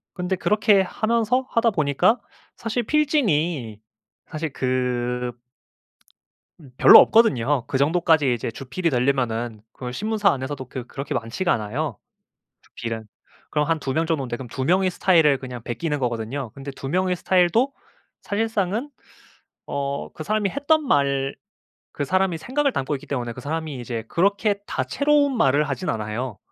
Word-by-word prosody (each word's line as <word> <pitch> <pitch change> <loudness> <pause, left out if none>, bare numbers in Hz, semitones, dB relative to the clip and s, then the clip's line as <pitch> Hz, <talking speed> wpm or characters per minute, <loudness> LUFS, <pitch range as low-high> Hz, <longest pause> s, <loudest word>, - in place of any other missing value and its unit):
근데 180 0 -1
그렇게 205 0 +3
하면서 230 +6 0
하다 230 0 +3
보니까 155 - +2 0.4
사실 230 +2 -2
필진이 175 - 0 0.5
사실 155 -2 -4
그 125 -1 -1 1.3
음 140 -4 -15
별로 - - +10
없거든요. 145 - +3
그 130 - -1
정도까지 155 -3 +3
이제 115 - -4
주필이 140 +8 -3
되려면은 120 -4 0
그걸 125 -1 -7
신문사 215 - +1
안에서도 130 -1 -4
그 125 -2 -6
그렇게 140 +2 -5
많지가 150 +11 -1
않아요, 120 +8 -3 0.6
주필은. 115 -1 -6 0.4
그럼 150 -1 0
한 165 -1 +1
2 135 -2 -3
명 160 +1 +1
정도인데 135 -7 -2
그럼 130 - -8
2 130 +2 -4
명의 185 +3 +3
스타일을 165 -6 +3
그냥 125 -3 -8
베끼는 145 +5 -3
거거든요. 120 +1 -3
근데 135 0 -7
2 135 0 -7
명의 185 +3 +1
스타일도 190 +10 +2 0.5
사실상은 220 +3 -1 0.8
어 140 0 -3
그 155 - -6
사람이 210 +1 0
했던 290 - +1
말, 140 - +1 0.6
그 145 - -3
사람의 185 +1 +1
생각을 275 - 0
담고 135 - -2
있기 135 - -9
때문에 120 -4 -3
그 125 - -9
사람이 155 0 -4
이제 115 -2 -4
그렇게 200 - +1
다채로운 285 -2 +1
말을 145 - +3
하지는 155 +1 -2
않아요. 110 +1 -4
150 Hz, 325 characters per minute, -23 LUFS, 130-195 Hz, 1.3 s, 별로